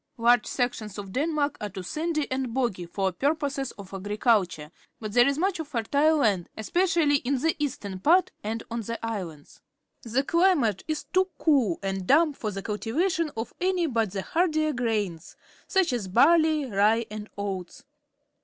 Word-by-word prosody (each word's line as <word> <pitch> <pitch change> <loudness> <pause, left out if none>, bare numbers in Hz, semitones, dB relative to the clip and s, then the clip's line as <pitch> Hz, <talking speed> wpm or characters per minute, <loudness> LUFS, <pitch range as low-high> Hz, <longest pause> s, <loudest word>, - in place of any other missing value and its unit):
— - - -49
Large 240 +1 +4
sections 230 -5 -2
of 200 -2 -7
Denmark 295 - -1
are 210 - -3
too 190 -1 -7
sandy 310 - -2
and 260 -2 -2
boggy 220 -10 -1
for 190 +2 -1
purposes 280 - -1
of 200 -2 -12
agriculture, 195 -5 0 0.3
but 215 -2 -6
there 245 +2 +6
is 280 0 +1
much 370 +1 0
fertile 290 +3 +1
land, 205 - +1
especially 330 - +2
in 275 +1 -1
the 320 +5 +1
eastern 255 -10 -3
part 350 - +4
and 225 +2 -3
on 230 0 -2
the 230 +2 -4
islands. 180 -10 -6 0.4
The 245 +4 0
climate 315 - +2
is 310 -1 -2
too 375 0 +1
cool 260 - +2
and 190 -1 -3
damp 305 +1 +4
for 215 - -3
the 195 -1 -6
cultivation 310 - -1
of 225 - -4
any 365 -1 +1
but 230 -8 0
the 195 -1 -3
hardier 310 -3 +1
grains, 210 - -2 0.3
such 380 -8 +2
as 225 -6 -2
barley, 310 - +4
rye, 220 +1 +2
and 215 0 -7
oats. 195 +4 -5
245 Hz, 165 wpm, -26 LUFS, 205-310 Hz, 0.4 s, there